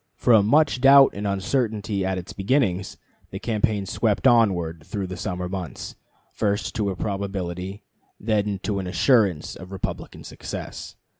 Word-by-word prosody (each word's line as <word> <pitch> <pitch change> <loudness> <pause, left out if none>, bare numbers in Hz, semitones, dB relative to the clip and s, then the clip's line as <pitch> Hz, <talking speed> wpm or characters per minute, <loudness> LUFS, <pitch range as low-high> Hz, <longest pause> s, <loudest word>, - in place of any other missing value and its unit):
From 110 -4 +4
much 145 0 +3
doubt 135 0 +8
and 100 +1 -4
uncertainty 105 0 -1
at 95 0 -1
its 90 0 -7
beginning, 100 -3 +1 0.5
the - - -6
campaign 110 -3 -1
swept - - 0
onward 90 -9 +3
through 100 +3 -4
the 95 0 -6
summer 90 -3 -4
months, 90 -7 -6 0.4
first 100 -1 -1
to 105 -2 0
a 95 - -3
probability, 95 -1 -4 0.4
then 105 -2 0
to 100 -2 -1
an 95 - -4
assurance 95 - +2
of 90 +2 -11
Republican 95 - -5
success. - - -7
100 Hz, 145 wpm, -24 LUFS, 95-110 Hz, 0.5 s, doubt